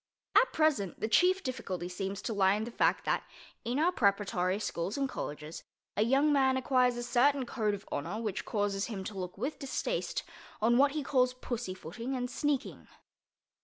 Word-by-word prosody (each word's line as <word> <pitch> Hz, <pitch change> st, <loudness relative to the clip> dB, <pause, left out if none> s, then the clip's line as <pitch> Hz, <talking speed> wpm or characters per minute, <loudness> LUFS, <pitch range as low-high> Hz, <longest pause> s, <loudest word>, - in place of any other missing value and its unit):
At -, -, +6 dB
present 300 Hz, -, +1 dB
the -, -, -1 dB
chief 365 Hz, -, +4 dB
difficulty 185 Hz, -9 st, -4 dB
seems 195 Hz, +2 st, -4 dB
to 230 Hz, -, -2 dB
lie 195 Hz, -1 st, +4 dB
in 215 Hz, -, -2 dB
the 235 Hz, -, -5 dB
fact -, -, +2 dB
that, -, -, +1 dB, 0.4 s
in 240 Hz, +2 st, -1 dB
our 330 Hz, +4 st, +3 dB
preparatory 200 Hz, -, +1 dB
schools 195 Hz, -1 st, -3 dB
and 275 Hz, -1 st, +1 dB
colleges, 150 Hz, -, -6 dB, 0.3 s
a -, -, +1 dB
young 275 Hz, +6 st, +4 dB
man 265 Hz, -2 st, +3 dB
acquires 250 Hz, -1 st, +2 dB
a 240 Hz, -, -3 dB
certain 255 Hz, +3 st, +3 dB
code 215 Hz, -4 st, 0 dB
of 200 Hz, -, -12 dB
honor 170 Hz, +9 st, -3 dB
which 215 Hz, -4 st, -3 dB
causes 205 Hz, -2 st, -1 dB
him 205 Hz, -5 st, -5 dB
to 195 Hz, 0 st, -6 dB
look 180 Hz, 0 st, -5 dB
with 265 Hz, +9 st, -3 dB
distaste 300 Hz, -, -2 dB, 0.4 s
on 235 Hz, +3 st, +4 dB
what 280 Hz, 0 st, +5 dB
he 305 Hz, -2 st, -2 dB
calls 255 Hz, -2 st, +2 dB
pussyfooting 230 Hz, 0 st, -5 dB
and 250 Hz, 0 st, -3 dB
sneaking. 285 Hz, +1 st, -2 dB
235 Hz, 180 wpm, -31 LUFS, 195-265 Hz, 0.4 s, At